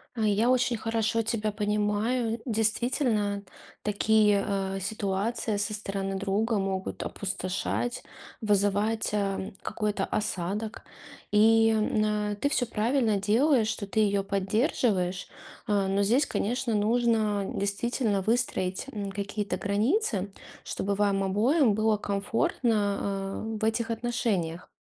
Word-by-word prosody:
Э, 225 - -3
я 215 +4 +2
очень 250 -2 +2
хорошо 225 +1 0
тебя 215 -1 -1
понимаю. 210 +3 0
Действительно, 220 -2 0 0.4
такие, 210 -1 +3
э, 195 -1 -1
ситуации 205 +2 -1
со 205 +1 -1
стороны 195 -2 -3
друга 205 +3 0
могут 190 -1 -3
опустошать, 195 +5 -3 0.4
вызывать, 205 +1 +1
эм, 195 -2 -2
какой-то 210 -3 -2
осадок. 210 +2 -3 0.5
И, 225 +1 +5
э, 210 -1 0
ты 285 - +2
всё 245 - +1
правильно 225 -1 +1
делаешь, 225 +4 +3
что 215 -2 -3
ты 220 - -1
её 200 -2 +2
поддерживаешь. 195 - 0 0.4
Э, 200 -2 +2
но 195 +1 +1
здесь, 245 +8 +3
конечно, 245 +1 -1
нужно 215 -1 +2
действительно 205 +1 0
выстроить, 215 -3 0
м, 200 -2 -4
какие-то 200 +1 -3
границы, 205 - 0 0.3
чтобы 200 +1 -2
вам 200 -1 +1
обоим 225 - +3
было 215 0 +2
комфортно, 200 -1 -1
э, 220 - -3
в - - -3
этих 225 +1 0
отношениях. 215 -8 -2
210 Hz, 115 wpm, -28 LUFS, 200-225 Hz, 0.5 s, И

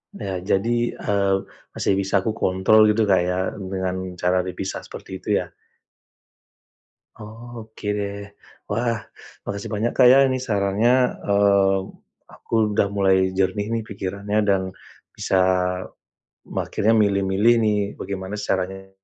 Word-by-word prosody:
Nah 95 - -4
jadi, 115 +6 0
eee, 100 -2 0 0.4
masih - - +1
bisa 95 0 -3
aku 110 - 0
kontrol 105 +1 +3
gitu 110 +1 +2
Kak, 95 - +5
ya 90 - 0 0.2
dengan 95 -1 -4
cara 90 +1 +2
dipisah 95 +1 -4
seperti - - -9
itu - - -19 0.2
ya? - - -15 1.6
Oh 115 +2 -10
oke 110 -1 -10
deh, 100 0 -4 0.4
wah 115 +1 -1 0.5
makasih 100 +2 -5
banyak 110 +3 -1
Kak, 130 - +5
ya 135 +1 +6
ini 130 0 0
sarannya, 105 +1 +2 0.3
eee, 100 -1 +3 0.5
aku - - -14 0.2
udah 100 - +3
mulai 95 -2 +2
jernih 105 +3 0
nih 115 -1 -1
pikirannya 100 +1 -3
dan, 95 -2 +2 0.6
bisa, 95 - +1 1.1
me - - -2
akhirnya 110 +2 +1
milih-milih 100 +2 +3
nih 105 -1 +2 0.2
bagaimana 95 0 -5
sih - - -5
caranya, 95 +1 -2
100 Hz, 130 wpm, -22 LUFS, 95-110 Hz, 1.6 s, ya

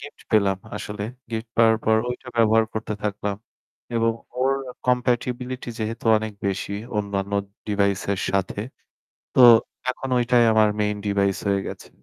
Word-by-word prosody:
Gift 145 - -11
পেলাম 100 -3 +3 0.2
আসলে। 105 0 -5 0.3
Gift 110 0 -4
পাওয়ার 115 -1 +5
পর 110 0 +4
ঐটা 125 +1 -7
ব্যবহার 110 0 +4
করতে 110 -1 -3
থাকলাম। 105 -1 -2 0.6
এবং 115 0 +2 0.3
ওর 135 +1 +3 0.4
compatibility 125 0 0
যেহেতু 115 +1 -4
অনেক 110 0 -5
বেশি, 100 +1 -2 0.2
অন্যান্য 100 -1 -2 0.3
device 100 -2 +1
এর 95 - -5
সাথে। 95 +1 -1 0.8
তো - - +3 0.5
এখন 135 +1 -7
ঐটাই 120 0 +4
আমার 110 -1 +5
main 105 0 +1
device 100 -1 +1
হয়ে 100 -1 +2
গেছে। - - -8
110 Hz, 140 wpm, -23 LUFS, 100-115 Hz, 0.8 s, পাওয়ার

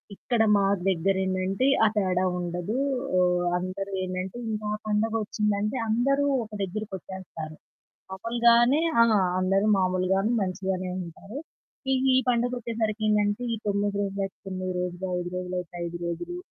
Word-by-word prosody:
ఇక్కడ 235 +1 0
మా 200 - +3 0.2
దగ్గరేందంటే 190 +3 +1 0.2
ఆ - - +6
తేడా 185 -2 +2 0.2
ఉండదు. 175 +6 -3 0.4
ఆహ్, 180 0 +3
అందరూ 185 +2 -4
ఏంటంటే 185 +3 -4
ఇంకా 215 -1 -3
ఆ - - -5
పండగ 215 +1 +1
వచ్చిందంటే 210 +2 -1
అందరూ 275 +5 +2 0.2
ఒక 215 - -12
దగ్గరకి 205 +2 -5
వచ్చేస్తారు. 165 -5 -8 0.6
మాములుగానే 235 +6 +4 0.2
ఆ! - - +9 0.4
అందరూ 195 +2 +2
మామూలుగానే 185 +3 +1
మంచిగానే 185 0 -2 0.2
ఉంటారు. 195 +8 -10 0.6
ఈ - - +4 0.2
ఈ - - +6
పండగొచ్చేసరికి 235 -3 0
ఏందంటే 210 +1 +2
ఈ - - -2
9 205 0 0
రోజులయితే 195 -1 -3
9 185 -1 -3
రోజులు, 180 +1 -3
5 175 - -4
రోజులయితే 180 -1 -4
5 170 0 -4
రోజులు 345 - -4
195 Hz, 130 wpm, -27 LUFS, 185-215 Hz, 0.6 s, ఆ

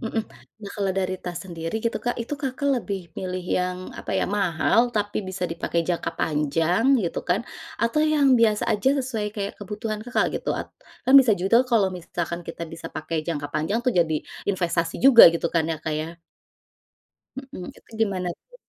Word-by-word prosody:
mhm. 225 -2 -2 0.4
Nah, 200 - -7
kalau 200 -2 0
dari 185 -1 -1
tas 175 -1 -5
sendiri 165 +1 -4
gitu, 230 - 0
Kak, 245 - 0
itu, 235 - -4
Kakak, 270 +1 -2
lebih 200 -3 -4 0.2
milih 185 -1 -4
yang, 180 0 -1 0.2
apa - - -5
ya, - - +1
mahal 200 +4 +2
tapi 205 0 0
bisa 185 -1 -3
dipakai 170 0 -1
jangka 175 -1 -1
panjang 160 +6 +1 0.2
gitu 170 - -2
kan, 180 +4 +2 0.4
atau 235 +6 +2
yang 300 -3 +4
biasa 215 -2 +3
aja 215 +5 +2
sesuai 235 -5 -3
kayak 200 -1 -3
kebutuhan, 210 +1 -4
Kakak, 245 +1 +1
gitu? - - -3
At - - -5 0.4
kan 260 - +4
bisa 245 -4 +3
juga 195 +7 +4
tuh 255 - -14
kalau 210 -5 +4
misalkan 170 -1 -4
kita 165 - -6
bisa 165 - -7
pakai 155 0 -3
jangka 145 -4 -3
panjang 160 +9 0
tuh 250 - +2
jadi 165 -3 +2 0.3
investasi 170 -3 0
juga 255 -7 +10
gitu 170 - -1
kan 165 -1 +3
ya, 165 - -1
Kak, 155 - -1
ya. 165 +2 -5 1.2
Mhm, 265 -9 -8
itu - - -25
gimana 190 -4 0
tuh? - - -26
190 Hz, 185 wpm, -24 LUFS, 170-225 Hz, 1.2 s, juga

